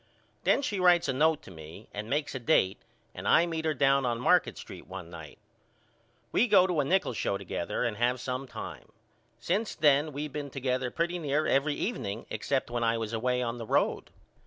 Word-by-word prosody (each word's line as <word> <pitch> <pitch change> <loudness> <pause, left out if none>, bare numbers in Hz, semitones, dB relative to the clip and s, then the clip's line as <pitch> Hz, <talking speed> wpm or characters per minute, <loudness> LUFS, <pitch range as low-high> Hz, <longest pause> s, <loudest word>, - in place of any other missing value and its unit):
Then 280 - +3
she 205 -6 -2
writes 175 -1 +5
a - - +1
note 155 +3 +2
to - - -12
me 80 +5 -11
and 105 +2 -5
makes 145 +2 -1
a 130 - -4
date 115 -8 +2 0.3
and - - -6
I 170 - +5
meet 160 -2 -3
her 155 -1 +1
down 135 0 +3
on 120 -2 -1
Market 125 - +3
Street - - -10
one 90 -2 -8
night. 80 -3 -10 0.9
We 245 - +3
go 195 -4 +6
to 180 -4 0
a - - +3
nickel 180 -1 +1
show 100 - -1
together 90 -3 -3
and 115 -3 -1
have 125 +2 +1
some 130 +2 -4
time. - - -8 0.5
Since 190 - -1
then 150 0 +3
we 145 +2 -4
been 145 0 -6
together 130 -1 -2
pretty 170 +5 -2
near 150 -1 0
every 145 +2 +2
evening 115 - -3
except 135 -3 -1
when 120 -1 -1
I 115 0 +2
was 115 0 -4
away 125 +2 0
on 120 0 -3
the 115 - -6
road. - - +1
135 Hz, 205 wpm, -29 LUFS, 115-155 Hz, 0.9 s, go